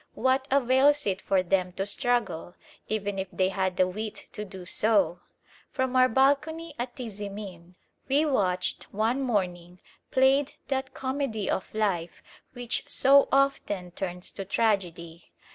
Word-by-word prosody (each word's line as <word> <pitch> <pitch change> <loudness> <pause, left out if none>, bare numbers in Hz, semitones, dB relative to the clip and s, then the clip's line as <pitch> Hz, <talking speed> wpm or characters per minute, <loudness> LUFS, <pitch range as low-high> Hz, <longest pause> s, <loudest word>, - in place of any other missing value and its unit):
What 260 +1 +1
avails 275 +2 +4
it 190 -2 -1
for 190 -2 +1
them 185 0 0
to 195 +2 -2
struggle, 205 -6 -1 0.3
even 205 -2 -2
if 190 - -2
they 185 0 +1
had 190 -1 -1
the 185 - +4
wit 215 +3 -6
to 210 - -5
do 190 -3 -10
so? 190 -3 +2 0.5
From 260 -1 -2
our 255 0 +6
balcony 295 +6 +1
at 245 0 -4
Tizimin 200 -6 -7 0.3
we 285 +4 +3
watched 185 -10 0
one 225 +6 0
morning 180 -7 -2 0.3
played 265 +2 +3 0.2
that 265 -1 -2
comedy 260 -6 -2
of 190 - -3
life 190 -6 -1 0.3
which 245 -1 -3
so 275 +1 +5
often 210 -9 +1
turns 180 -1 -5
to 195 - -6
tragedy. 180 -5 -1
210 Hz, 140 wpm, -27 LUFS, 185-260 Hz, 0.5 s, our